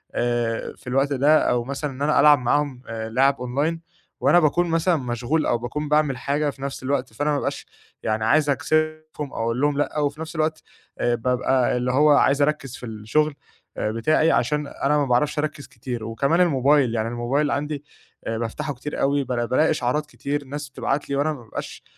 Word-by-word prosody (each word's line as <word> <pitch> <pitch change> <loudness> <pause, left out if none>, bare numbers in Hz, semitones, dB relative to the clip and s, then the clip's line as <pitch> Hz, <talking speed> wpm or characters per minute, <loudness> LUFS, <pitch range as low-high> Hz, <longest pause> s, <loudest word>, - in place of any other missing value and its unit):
آآ، 120 -1 -1
في - - -19
الوقت 135 +3 +1
ده 145 +4 +4
أو 120 -1 +1
مثلًا 140 +3 -4
إن 130 +1 -10
أنا 150 +1 +3
ألعب 145 0 +7
معاهم 135 +1 0
آآ، 110 -1 -5
لِعَب 135 +4 +3
online 140 +7 -1 0.4
وأنا 175 - +5
باكون 170 +2 +2
مثلًا 165 +2 +2
مشغول 125 +4 -1
أو 120 - +2
باكون 145 +6 -4
باعمل 150 -3 +2
حاجة 145 +4 0
في 135 - -10
نَفْس 135 -1 -5
الوقت، 130 -3 -1
فأنا 145 +6 -1
ما 150 - +2
بابقاش - - -3 0.4
يعني 110 0 0
عايز 150 +5 +3
أكسِفهم 155 0 -1
أو - - -3
أقول 115 +3 -1
لهم 145 -1 +2
لأ، 145 +1 -1
و 145 - +2
في 145 +3 -12
نَفْس 160 +1 -7
الوقت 155 0 -1 0.4
آآ، 120 0 +2
بابقى 125 +1 +1
اللي 125 +1 0
هو 145 +4 +4
عايز 140 0 +4
أركّز 145 -3 0
في - - -9
الشُغل 115 +8 0 0.4
آآ، 105 - -1
بتاعي 155 +8 +2
عشان 150 -1 +1
أنا 145 +1 0
ما 145 - +2
باعرفش 135 +4 +1
أركّز 150 -1 -3
كتير، 120 -1 -6
وكمان 140 +10 +1
الموبايل 140 -6 +3
يعني 110 0 0
الموبايل 130 +5 0
عندي 145 0 -2 0.4
آآ، 115 0 -1
بافتحه 115 +5 -3
كتير 150 +4 -6
أوي 140 0 +2
بالا 120 -2 -1
بالاقي 130 +6 +2
إشعارات 150 0 0
كتير 140 +3 -4
ناس 145 +1 -6
بتبعت 140 +1 -2
لي، 140 - -1
وأنا 145 +3 +1
ما 140 - -10
بابقاش 110 - -7
140 Hz, 200 wpm, -23 LUFS, 125-150 Hz, 0.4 s, ألعب